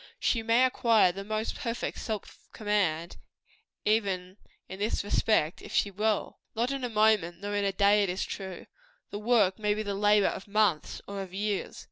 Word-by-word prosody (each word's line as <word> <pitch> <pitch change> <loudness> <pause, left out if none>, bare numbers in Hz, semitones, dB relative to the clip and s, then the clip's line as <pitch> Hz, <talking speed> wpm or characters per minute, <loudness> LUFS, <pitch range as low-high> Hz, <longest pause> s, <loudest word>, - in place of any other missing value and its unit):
She 230 - +1
may 230 +3 +4
acquire 230 -6 +3
the 195 +2 -7
most 215 +2 -2
perfect 235 -3 -4
self 215 -3 -5
command, 190 -6 -1 0.7
even 195 -3 0 0.3
in 190 - -8
this 210 0 0
respect, 205 -5 +1
if - - -10
she 200 - +2
will. 210 +2 -1 0.2
Not 240 +4 0
in 275 -1 -3
a 245 - -1
moment, 215 -6 +2
nor 205 +1 -4
in 205 -1 0
a 195 - +1
day, 200 +2 +4
it 200 - +1
is 185 +2 -2
true. 190 -3 -7 0.5
The 205 - -4
work 215 -3 +2
may 210 -1 +1
be 215 - -2
the 200 -1 -3
labor 205 0 +4
of 195 - -2
months, 205 -6 0
or 200 0 -5
of 190 -1 -8
years. 205 0 -2
205 Hz, 185 wpm, -29 LUFS, 195-220 Hz, 0.7 s, may